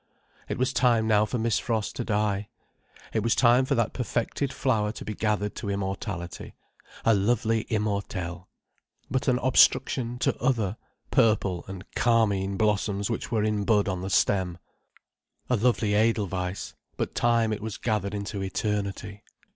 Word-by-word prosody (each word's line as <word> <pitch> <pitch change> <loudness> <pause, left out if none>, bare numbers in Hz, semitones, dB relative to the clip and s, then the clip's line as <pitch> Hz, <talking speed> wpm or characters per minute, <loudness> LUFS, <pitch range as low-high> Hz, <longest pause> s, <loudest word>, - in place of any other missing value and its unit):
It - - -2
was 130 +1 0
time 120 -3 +3
now 105 -1 +4
for 125 - -3
Miss 115 -1 +1
Frost 110 -4 -2
to - - -1
die. 105 -2 -1 0.6
It 110 - +1
was 115 +1 +2
time 125 +1 +5
for - - +1
that 115 -2 0
perfected 125 +2 -2
flower 110 -7 0
to - - -9
be 110 - -3
gathered 105 -1 -1
to 100 - -4
immortality. 95 -2 -4 0.5
A 115 - +6
lovely 110 +2 +1
immortel. 100 -5 -2 0.6
But 130 +2 -1
an 125 -2 +4
obstruction 130 -1 +3
to - - +1
other, 115 -5 +1 0.3
purple 105 -8 +2
and 95 0 -8
carmine 100 -5 +2
blossoms 105 0 0
which 115 - -3
were 110 -3 +1
in 105 -1 0
bud 105 -1 +2
on 95 -2 -2
the 95 - -4
stem. 95 -2 +1 0.9
A - - +5
lovely 110 -2 +1
edelweiss—but 100 -4 -1
time 115 -2 +2
it 110 - -5
was 110 -1 -5
gathered 105 -3 -1
into 100 0 -4
eternity. 100 +1 -3
105 Hz, 150 wpm, -27 LUFS, 100-115 Hz, 0.9 s, A